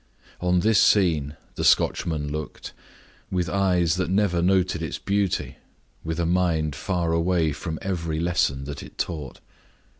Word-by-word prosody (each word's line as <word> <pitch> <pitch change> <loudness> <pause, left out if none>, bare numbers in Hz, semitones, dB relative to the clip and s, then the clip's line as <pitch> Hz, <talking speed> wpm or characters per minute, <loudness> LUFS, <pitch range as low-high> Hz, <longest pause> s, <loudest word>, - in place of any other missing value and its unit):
On 90 0 +2
this 110 0 +4
scene 80 -8 +3 0.2
the - - -4
Scotchman 75 -4 +2
looked, 75 0 -6 0.6
with 90 -1 -1
eyes 90 -4 +2
that 95 -2 -1
never 95 -3 +2
noted 90 -2 +2
its 80 - -3
beauty, 100 -2 -1 0.5
with 80 +1 -3
a 85 - +1
mind 85 -4 +1
far 85 +2 -1
away 85 -1 +2
from 80 +2 -5
every 85 -4 -2
lesson 85 -5 0
that 70 0 -6
it - - -12
taught. 75 -7 -4
85 Hz, 145 wpm, -24 LUFS, 80-95 Hz, 0.6 s, this